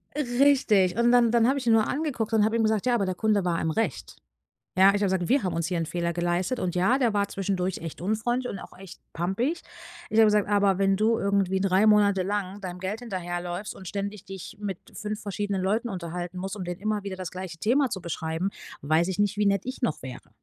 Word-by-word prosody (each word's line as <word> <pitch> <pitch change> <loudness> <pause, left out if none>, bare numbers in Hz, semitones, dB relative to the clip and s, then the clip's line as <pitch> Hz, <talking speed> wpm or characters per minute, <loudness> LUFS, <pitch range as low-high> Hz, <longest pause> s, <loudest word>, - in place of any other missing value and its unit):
Richtig. 245 -8 +3
Und 235 0 +4
dann 240 -2 +5
dann 235 -1 +4
habe 270 +2 +2
ich 265 - -4
ihn 230 - +4
nur 220 -1 +4
angeguckt 265 -7 -2
und 215 -2 +4
habe 220 +1 0
ich - - +1
ihm - - +3
gesagt: 220 0 +1
„Ja, 245 -1 +3
aber 205 -4 +1
der 185 -1 -2
Kunde 210 -1 +1
war 170 -2 0
im 160 - 0
Recht“. 225 +8 -2 0.6
Ja, 190 +1 +7
ich 200 - +3
habe - - +3
gesagt: 185 -2 0
„Wir 270 +2 +3
haben 180 -3 -1
uns 165 -1 -1
hier 180 -1 -1
'n 165 - -1
Fehler 170 0 -2
geleistet,“ 175 +7 -1
und 180 -4 -2
ja, 195 +9 +3
der 235 -5 +2
war 200 0 +2
zwischendurch 190 -1 -2
echt 165 -2 -7
unfreundlich 225 +6 -1
und 195 - -6
auch - - -12
echt 190 -1 -12
pampig. 215 - -1 0.5
Ich 220 - +2
habe 225 - +8
gesagt: 210 -1 +3
„Aber 200 -2 +3
wenn 195 0 +3
du 220 +2 +2
irgendwie 195 -1 +1
3 195 +2 +3
Monate 205 -2 +4
lang 200 0 -3
deinem 180 -2 -6
Geld 190 +4 -3
hinterherläufst 180 -3 -4
und 190 - -10
ständig 200 +1 -4
dich 195 -1 -8
mit 200 -3 -4 0.2
5 210 0 -4
verschiedenen 200 -1 -2
Leuten 220 +5 0
unterhalten 175 -1 -5
musst, 190 +2 -4
um 200 - -5
denen 175 0 -5
immer 215 0 -1
wieder 200 -1 -5
das 185 -2 -6
gleiche 185 -2 -7
Thema 255 - +2
zu 190 - -4
beschreiben, 165 +1 -3 0.3
weiß 155 +4 +2
ich 190 - -3
nicht, 205 0 +1
wie 205 -1 +2
nett 200 -1 +2
ich 255 +2 -6
noch 160 - -1
wäre.“ 130 -2 -9
200 Hz, 240 wpm, -26 LUFS, 180-220 Hz, 0.6 s, habe